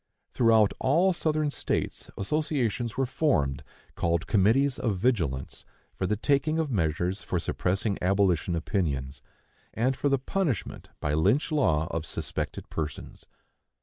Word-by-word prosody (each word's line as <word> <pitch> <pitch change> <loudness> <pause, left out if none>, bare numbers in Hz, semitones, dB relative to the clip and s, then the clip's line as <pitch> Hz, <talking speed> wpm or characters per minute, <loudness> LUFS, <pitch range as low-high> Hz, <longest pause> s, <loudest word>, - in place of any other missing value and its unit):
Throughout 110 -3 +4
all 170 +8 +3
the 175 - -4
Southern 155 -2 +1
States - - -3
associations 125 -2 -1
were 135 - +2
formed, 120 - 0 0.3
called 85 -1 0
committees 120 +7 +3
of 105 -5 0
vigilance, 90 - -1 0.3
for 95 - -2
the 105 - +1
taking 145 +7 +1
of 160 -3 -1
measures 90 0 0
for 90 - -2
suppressing 95 +4 -1
abolition 90 -2 +2
opinions, 70 -7 -2 0.5
and 130 +4 +1
for 145 - 0
the 135 - +3
punishment 145 - -2
by 75 - 0
Lynch 105 - +2
law 80 - +2
of 85 -1 -3
suspected - - -4
persons. 75 -2 -6
105 Hz, 135 wpm, -27 LUFS, 85-140 Hz, 0.5 s, Throughout